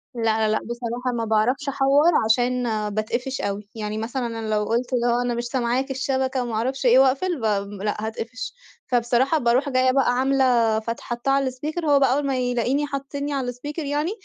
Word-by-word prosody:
لأ، 235 - -4
لأ، 220 -1 +2
لأ 215 0 +1
بصراحة 240 +1 -3
ما 230 - -1
باعرفش 230 +7 +1
أحوّر 280 +4 +4
عشان 245 +3 +2 0.3
باتقفش 235 +5 -2
أوي. 200 +1 -3
يعني 215 -1 -4
مثلًا 240 +3 -3
أنا 225 -1 -5
لو 210 - +1
قُلت 240 +3 -1
اللي 240 -1 +1
هو 240 +1 +2
أنا 245 -1 -1
مش 240 - -2
سامعاك 255 +2 -1
الشبكة 265 -1 -1
وما 235 -2 -5
أعرفش 260 +5 -2
إيه 245 +1 +6
وأقفل، 275 +6 +2
بام 200 -2 0
لأ 210 - 0
هاتقفش. 230 - -6 0.3
فبصراحة 245 +4 +2
باروح 255 +2 +2
جايّة 255 -1 +3
بقى 265 -2 +2
عاملة 250 -4 +2
فتح 230 +1 -5
حاطّاه 240 +3 -2
على 275 -1 +2
الspeaker 305 +7 -5
وهو 290 -2 +4
بقى 265 -2 +3
أول 285 +1 0
ما 270 -2 0
يلاقيني 250 +4 0
حطّني 280 +1 -4
على 260 -3 -1
الspeaker 295 +6 -7
يعني، 295 +5 -1
250 Hz, 195 wpm, -23 LUFS, 230-270 Hz, 0.3 s, إيه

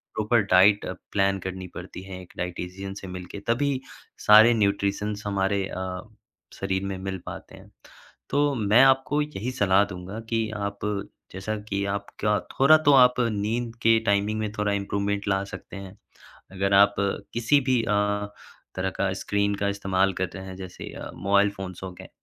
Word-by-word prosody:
Proper 110 +2 +2
diet 100 +3 +5 0.3
plan 100 -1 +1
करनी 95 0 -6
पड़ती - - -8
है 95 -1 -8
एक 90 - -15
डायटीशियन 90 +2 -5
से 95 -1 -9
मिल 90 0 -7
के। 100 - -6
तभी 135 +3 +1 0.5
सारे 110 +3 +8
न्यूट्रिशंस 100 0 0
हमारे 100 0 0
अ, 95 -1 -5 0.5
शरीर 95 0 -2
में 95 -1 -3
मिल 95 0 -4
पाते - - -9
हैं। - - -16 0.6
तो 145 0 +2
मैं 110 +2 +4
आपको 135 +2 +3
यही 130 -5 -4
सलाह 100 -5 +3
दूँगा 95 +2 -7
कि 115 -1 0
आप 100 0 -4 0.5
जैसा 95 +3 -3
कि 100 0 -1
आपका 105 +1 -1 0.2
थोड़ा 155 +4 +7
तो 145 - +8
आप 125 -2 +6 0.2
नींद 115 +3 -2
के 115 0 +5
टाइमिंग 100 +1 +1
में 105 -1 -2
थोड़ा 105 0 0
इम्प्रूवमेंट 100 0 -2
ला 95 0 +1
सकते 95 - -9
हैं। 95 0 -10 0.6
अगर 95 +1 0
आप 100 +1 +6 0.4
किसी 120 +5 +3
भी 125 -3 +3
अ, 105 -1 0 0.5
तरह 95 0 -1
का 95 -1 +1
स्क्रीन 100 0 0
का 100 0 -1
इस्तेमाल 95 -1 +1
करते 95 0 -3
हैं, 95 0 -8
जैसे 95 -2 -8
अ, - - -7
मोबाइल 100 +1 +2
फ़ोन्स 95 -2 -8
हो 95 - -6
गए। 90 - -12
100 Hz, 165 wpm, -25 LUFS, 95-110 Hz, 0.6 s, सारे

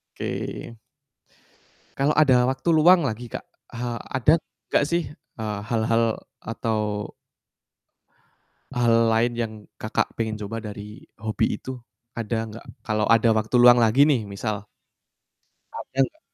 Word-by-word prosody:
Oke. 115 - -5 1.2
Kalau 140 +2 +2
ada 130 -5 +5
waktu 135 +6 -1
luang 175 +3 +6
lagi 120 -3 -3
Kak, 115 - -6 0.3
eee, 120 0 -3 0.2
ada 140 +5 +4 0.4
gak 140 - +3
sih, 170 -4 -1
eee, 110 -7 -7
hal-hal 115 0 +1 0.2
atau 105 -2 -3 1.7
hal 120 -1 +3 0.2
lain 115 +2 +2
yang 115 -2 -2 0.3
Kakak 110 - -1
pengen 110 -1 -1
coba 105 +2 -5
dari 105 -1 -8 0.2
hobi 110 -1 0
itu? 130 +3 -7 0.4
Ada 110 -1 -2
gak? 115 - -11 0.2
Kalau 110 -1 0
ada 115 0 +5
waktu 110 +2 0
luang 120 0 +8
lagi 115 +5 +5
nih, 130 -8 +2
misal. 105 +1 -4 1.1
Ada - - -6 0.2
gak? 315 - -23
115 Hz, 125 wpm, -24 LUFS, 110-125 Hz, 1.7 s, luang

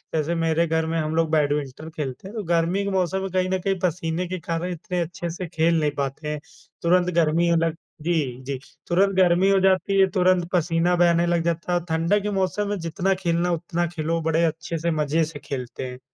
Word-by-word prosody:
जैसे 160 +2 0
मेरे 165 0 +2
घर 160 0 +1
में 165 +1 -1
हम 155 +1 -2
लोग 165 -1 +2
बैडमिंटन 150 0 0
खेलते 135 +3 -5
हैं, 210 - -10
तो 215 - -2
गर्मी 170 +3 +1
के 200 - -2
मौसम 190 0 0
में 195 - -3
कहीं 185 0 +1
न 190 0 0
कहीं 195 +1 -1
पसीने 175 0 -1
के 185 0 -4
कारण 170 +2 -3
इतने 180 +1 -4
अच्छे 170 +1 -4
से 175 +2 -5
खेल 165 0 +2
नहीं 150 -1 +1
पाते 140 +2 -3
हैं, 150 0 -3 0.4
तुरंत 180 +1 +3
गर्मी 170 +1 +3
अ, 170 - +4
लग 165 0 +1 0.3
जी, 175 +3 0 0.3
जी। 135 0 -4 0.3
तुरंत 195 +3 +2
गर्मी 185 +1 +4
हो 195 -1 +4
जाती 190 +1 +3
है, 190 - +6
तुरंत 185 -2 +2
पसीना 170 +1 +2
बहने 170 -1 +4
लग 170 -1 +1
जाता 170 +1 -1
है 175 - +3
और 175 - -12
ठंडा 165 +5 +2
के 210 +1 -3
मौसम 195 +1 0
में 205 - -1
जितना 170 +3 0
खेलना 170 0 +1
है 175 - +2
उतना 170 +1 -2
खेलो, 165 0 -2
बड़े 160 +1 +1
अच्छे 165 +1 -3
से 170 +2 -1
मज़े 155 +1 +1
से 155 -1 -5
खेलते 130 -2 -5
हैं। 125 - -10
170 Hz, 225 wpm, -24 LUFS, 160-180 Hz, 0.4 s, है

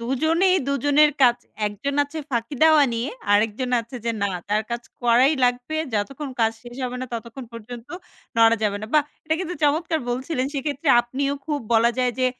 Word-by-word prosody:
দুজনেই 320 +10 +2
দুজনের 290 +2 +4
কাজ। 240 -2 +6 0.3
একজন 210 +8 -3
আছে 290 +3 -6
ফাঁকি 235 +3 -2
দেওয়া 315 -2 +7
নিয়ে 230 +3 -2 0.2
আরেকজন 220 +5 +1
আছে 235 +3 -9
যে 235 - +1
না - - +3 0.2
তার 210 +1 +1
কাজ 235 0 -3 0.2
করাই 245 +4 +5
লাগবে। 245 +5 0 0.2
যতক্ষণ 270 +7 -3
কাজ 225 0 +3
শেষ 240 0 -11
হবে 250 0 -4
না - - -4
ততক্ষণ 235 +3 -6
পর্যন্ত 230 +1 -9 0.5
নড়া 230 0 +6
যাবে 205 -1 +1
না। 215 - -4
বাহ! 300 - +6 0.2
এটা 315 0 +1
কিন্তু 360 -1 -4
চমৎকার 320 +3 +2
বলছিলেন 260 +2 -2
সেক্ষেত্রে 285 +1 -2
আপনিও 275 +4 -2
খুব 295 -2 -1
বলা 230 +1 +5
যায় 250 -1 +2
যে, 255 - +3
255 Hz, 180 wpm, -23 LUFS, 230-290 Hz, 0.5 s, দেওয়া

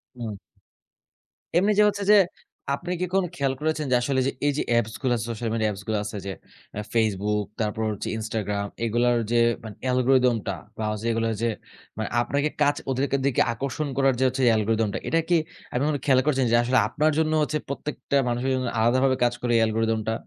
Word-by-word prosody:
হুম। 115 -4 -5 1.2
এমনি 200 +4 +3
যে 210 - +7
হচ্ছে 200 0 -4
যে, 210 - +8 0.6
আপনি 175 +4 -6
কি - - +2
কোন 195 - +3
খেয়াল 135 -3 0
করেছেন 155 -1 -1
যে, - - +5
আসলে 130 +1 0 0.3
এই 145 - +4
যে - - +1
অ্যাপস 115 -2 +1
গুলো 130 -2 +1
আছে 115 - -3
সোশ্যাল 115 0 -3
মিডিয়া 110 -1 +1
অ্যাপস 100 0 -6
গুলো 110 - 0
আছে 105 - -5
যে, 100 - -3 0.5
আ - - -1
Facebook, 105 -2 +1
তারপর 110 0 -1
হচ্ছে 105 - -5
Instagram 105 -2 -2 0.2
এগুলার 120 +1 +2
যে, 120 - +3 0.3
মানে 110 -2 -8
অ্যালগরিথম 125 -1 +3
টা 100 - -1 0.2
বা 110 - -3 0.3
এগুলো 115 0 0
যে, 115 - +2 0.5
মানে 110 -2 -3
আপনাকে 140 +5 0
কাচ 145 0 +4
ওদেরকে 135 +1 0
দিকে 140 -3 +2
আকর্ষণ 140 +4 -3
করার 135 -1 +4
যে - - +2
হচ্ছে, 130 +1 -2
অ্যালগরিথম 110 0 +1
টা। - - -1
এটা 165 - +2
কি 175 - +5 0.3
আপনি 125 - -1
কখনো 150 -2 0
খেয়াল 130 -3 +5
করেছেন 135 -4 +2
যে, - - +5
আসলে 125 +2 +2
আপনার 155 +6 +1
জন্য 155 -1 +1
হচ্ছে 150 +1 -1
প্রত্যেকটা 140 0 -2
মানুষের 120 +3 -1
জন্য 130 -1 -2
আলাদাভাবে 130 +3 +3
কাজ 120 0 +3
করে, 120 - -1
এই - - +4
অ্যালগরিথম 110 0 +1
টা? - - +1
120 Hz, 200 wpm, -25 LUFS, 110-140 Hz, 1.2 s, যে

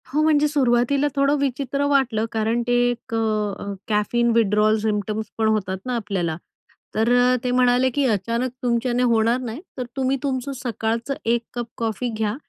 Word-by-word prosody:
हो. 295 +4 0
म्हणजे 300 -1 +4
सुरुवातीला 275 0 +2
थोडं 280 +1 +3
विचित्र 280 +1 -1
वाटलं, 255 -6 +2
कारण 225 +2 0
ते 245 - +2 0.2
एक 245 0 -6
अ, 210 -3 -1
कॅफीन 230 +3 +1
विथड्रॉवल 215 -1 +3
सिम्प्टम्स 215 0 -1
पण 220 -1 +2
होतात 200 -3 0
ना 250 -1 -2
आपल्याला. 190 -8 -2 0.6
तर 225 +2 +2
अ, 250 +1 +4
ते 250 - 0
म्हणाले 250 +1 +3
की 285 -1 +2
अचानक 230 +4 -1
तुमच्याने 240 +1 +1
होणार 230 0 +3
नाही 245 +3 -6 0.2
तर 250 - -3
तुम्ही 265 0 0
तुमचं 270 -1 -2
सकाळचं 230 +2 -2
1 235 +1 +2
कप 240 -1 -3
कॉफी 230 +2 -2
घ्या 215 -1 -1
235 Hz, 165 wpm, -22 LUFS, 220-255 Hz, 0.6 s, म्हणजे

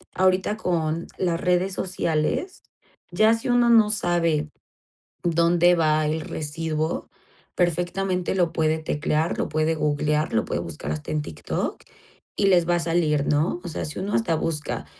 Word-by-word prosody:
ahorita 190 +3 +2
con 165 -4 -1
las 170 -2 0
redes 180 +2 +1
sociales, 185 - -2 0.5
ya 215 +5 +4
si 225 +2 -3
uno 245 -1 +4
no 225 -3 +6
sabe 170 -6 +1 0.7
dónde 170 +1 +4
va 155 -2 +2
el 155 +1 -1
residuo, 155 +1 -3 0.5
perfectamente 180 +2 0
lo 175 -3 +2
puede 160 0 +1
teclear, 155 +1 -1
lo - - -2
puede 155 +1 +1
googlear, 150 0 0
lo 110 - +1
puede - - -2
buscar 80 -3 -6
hasta 75 - -5
en 155 -1 0
TikTok 75 - -4 0.5
y 200 - +2
les 175 -3 +4
va 175 - +4
a - - +1
salir, 165 -4 +1
¿no? 150 +4 +1
O - - -6
sea, 155 - -4
si 155 - -6
uno 200 +2 -3
hasta 175 -8 +1
busca 150 - -3
165 Hz, 155 wpm, -24 LUFS, 155-180 Hz, 0.7 s, no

